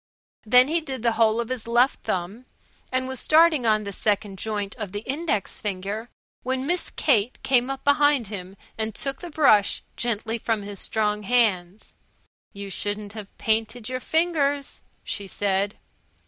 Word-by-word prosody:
Then 250 +4 +7
he 330 +3 +1
did 265 -6 -6
the 235 - +3
whole 225 0 +3
of 235 - -2
his 255 -3 -4
left 240 +3 +3
thumb, 195 +8 -3 0.4
and 255 0 0
was 260 -1 -3
starting 310 -5 +4
on 215 -1 +3
the 200 - -5
second 200 -1 -1
joint 205 -2 -3
of 210 -4 -6
the 205 - -3
index 270 -4 -2
finger 205 +3 -4 0.3
when 260 +1 -2
Miss 350 +4 -1
Kate 240 -4 +1
came 250 -1 +3
up 270 0 -4
behind 285 -3 +4
him 195 -2 -7 0.2
and 220 -1 -2
took 275 -1 -1
the 350 - -6
brush 245 -10 +3
gently 230 -1 -2
from 220 -2 -1
his 200 -1 -7
strong 210 -1 0
hands. 205 -4 0 0.6
"You 200 -1 -7
shouldn't 205 +1 -3
have 210 -3 -9
painted 225 +1 -1
your 255 0 -2
fingers," 290 -2 0 0.2
she 200 -2 -5
said. 200 +1 0
225 Hz, 160 wpm, -24 LUFS, 205-260 Hz, 0.6 s, Then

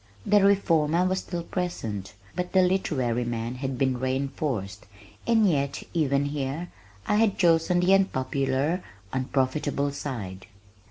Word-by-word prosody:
The 205 -1 +4
reformer 175 -4 +3
was 185 +1 +1
still 175 -2 -5
present, 115 - -4 0.2
but 180 0 -3
the 190 -1 +6
literary 135 -10 +1
man 120 0 -3
had 130 0 -4
been 130 -2 +1
reinforced, 130 -6 -2 0.4
and 225 -3 +4
yet, 140 -4 0
even 145 -4 +2
here, 145 +4 -3 0.3
I 210 - +2
had 220 -2 +3
chosen 175 0 +3
the 185 +2 +4
unpopular, 140 -2 +1 0.3
unprofitable 140 +2 0
side! 105 -10 -6
145 Hz, 125 wpm, -26 LUFS, 130-180 Hz, 0.4 s, the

